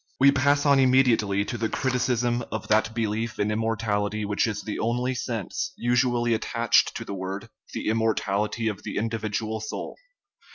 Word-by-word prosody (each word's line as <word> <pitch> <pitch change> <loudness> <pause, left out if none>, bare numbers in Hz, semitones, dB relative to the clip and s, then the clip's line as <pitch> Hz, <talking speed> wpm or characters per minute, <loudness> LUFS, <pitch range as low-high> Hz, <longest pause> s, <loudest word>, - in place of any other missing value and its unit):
We 140 +1 +7
pass 145 +1 +2
on 140 -1 +5
immediately 120 -7 +3
to 120 - -4
the 110 0 0
criticism 125 -2 0
of 110 - -4
that 110 +1 +2
belief 110 0 -2
in 105 +1 0
immortality 105 -1 -1
which 105 +3 +1
is 110 - -3
the 105 - -4
only 125 +3 0
sense 130 - -3
usually 120 -1 +2
attached 115 +1 +2
to - - -6
the - - -5
word, 95 +1 -5 0.2
the - - -3
im 110 +1 +2
mortality 110 0 0
of 105 -3 -3
the - - -5
individual 110 0 -2
soul. 110 - -5
115 Hz, 165 wpm, -26 LUFS, 105-125 Hz, 0.2 s, We